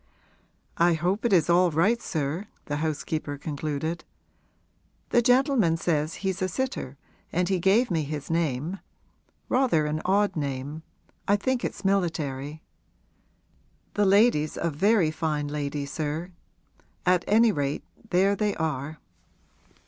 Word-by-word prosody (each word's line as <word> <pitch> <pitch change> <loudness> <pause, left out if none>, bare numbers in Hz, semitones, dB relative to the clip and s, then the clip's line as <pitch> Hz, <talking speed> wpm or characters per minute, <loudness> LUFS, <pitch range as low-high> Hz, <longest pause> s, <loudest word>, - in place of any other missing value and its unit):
'I 170 0 +4
hope 180 +8 -1
it 235 - +2
is 170 -6 +4
all 175 +1 +4
right, 195 +10 +2
sir,' 160 +5 -3 0.2
the 145 - -2
housekeeper 155 -1 -2
concluded. 155 +3 -3 1.1
'The 240 - +5
gentleman 245 - +3
says 155 -2 0
he's 190 -1 -1
a 185 - +2
sitter 185 - -3 0.3
and 180 +1 0
he 190 -2 +1
gave 200 +6 +3
me 165 -2 +1
his 150 0 -5
name 165 +2 -1 0.7
rather 250 - +2
an 150 +1 -2
odd 200 +1 +2
name; 140 +1 -4 0.5
I 205 - +5
think 255 +4 -1
it's - - -4
military. 155 -6 -1 1.3
The 205 - +2
lady's 195 -6 +3
a 170 - 0
very 185 +1 +3
fine 155 -2 -2
lady, 145 -1 -3
sir; 155 +4 -4 0.7
at 180 -1 +3
any 225 +2 +5
rate 145 -5 -2 0.3
there 195 +3 +3
they 210 0 0
are.' 155 -1 -3
165 Hz, 130 wpm, -26 LUFS, 150-195 Hz, 1.3 s, The